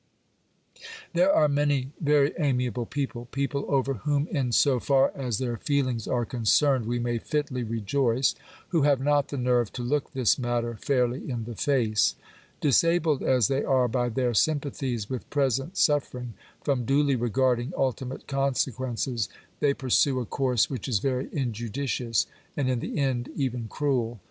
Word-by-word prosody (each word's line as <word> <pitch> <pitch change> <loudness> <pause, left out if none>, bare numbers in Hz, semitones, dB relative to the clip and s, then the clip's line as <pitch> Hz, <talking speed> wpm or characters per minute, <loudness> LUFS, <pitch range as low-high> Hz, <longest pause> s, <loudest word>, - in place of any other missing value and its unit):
There 180 +3 +4
are 155 - +4
many 145 -2 +1
very 145 -1 +3
amiable 125 -5 0
people— 130 -4 -4
people 140 +1 -2
over 135 -1 +1
whom 140 +6 0
in 135 -7 -1
so 130 +1 +3
far 135 +2 +3
as 125 -6 -2
theSr 120 -3 -2
feelings 130 -6 0
are 120 -2 0
concerned 125 +2 +2
we 120 +1 0
may 120 -1 -1
fitly 140 -1 -2
rejoice 115 +3 +1 0.2
— - - -23
who 165 -3 +2
have 140 -2 +3
not 145 +1 +2
the 140 - -5
nerve 125 -3 +1
to 125 - -4
look 140 +4 -1
this 130 -1 +2
matter 120 -1 -1
fairly 125 +1 0
in 120 -3 -3
the 120 +1 -6
face. 115 -3 +1 0.5
Disabled 155 +1 +3
as 125 -5 +3
they 135 +1 0
are 130 -2 +2
by 120 +1 0
their 120 +1 0
sympathies 135 -4 0
with 130 -1 -6
present 135 - 0
suffer 145 -6 +2
ing, 125 -2 -6 0.3
from 135 -4 0
duly 140 +2 +2
regarding 120 +2 +1
ultimate 130 0 -2
consequences, 130 -4 -1 0.3
they 145 - +3
pursue 130 +1 +2
a 125 - -3
course 125 -2 +1
which 130 -4 -5
is 120 -5 +2
very 130 +4 -1
injudicious, 120 -1 -1 0.3
and 130 -3 +1
in 125 - 0
the - - -4
end 130 -3 0
even 125 -4 -2
cruel. 120 -5 -1
130 Hz, 160 wpm, -26 LUFS, 120-140 Hz, 0.5 s, There